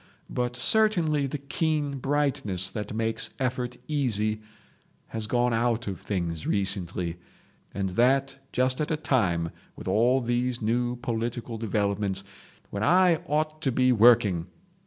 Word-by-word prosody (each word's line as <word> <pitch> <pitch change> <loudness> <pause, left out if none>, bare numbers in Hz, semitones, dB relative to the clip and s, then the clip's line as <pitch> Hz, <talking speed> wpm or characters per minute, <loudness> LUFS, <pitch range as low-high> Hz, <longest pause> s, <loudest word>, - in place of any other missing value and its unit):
But 125 0 -1
certainly 160 - +2
the 140 - -3
keen 145 0 -1
brightness 125 -10 0
that 105 -2 -5
makes 110 +1 0
effort 125 -1 -2
easy 110 -7 0 0.7
has 110 -1 -4
gone 120 +1 +1
out 115 0 +1
of 95 -2 -4
things 85 -5 -3
recently, 90 -3 -1 0.5
and 95 -1 -2
that 135 +7 +2
just 130 +2 +1
at 150 - -1
a 160 - 0
time 90 - +1 0.2
with - - -9
all 120 +5 +3
these 120 0 -1
new 120 +2 0
political 120 -1 -3
developments—when 100 -2 -3
I 180 +4 +5
ought 155 +1 -1
to 135 - +1
be 130 +1 +3
working. 105 -7 +5
120 Hz, 130 wpm, -27 LUFS, 105-135 Hz, 0.7 s, I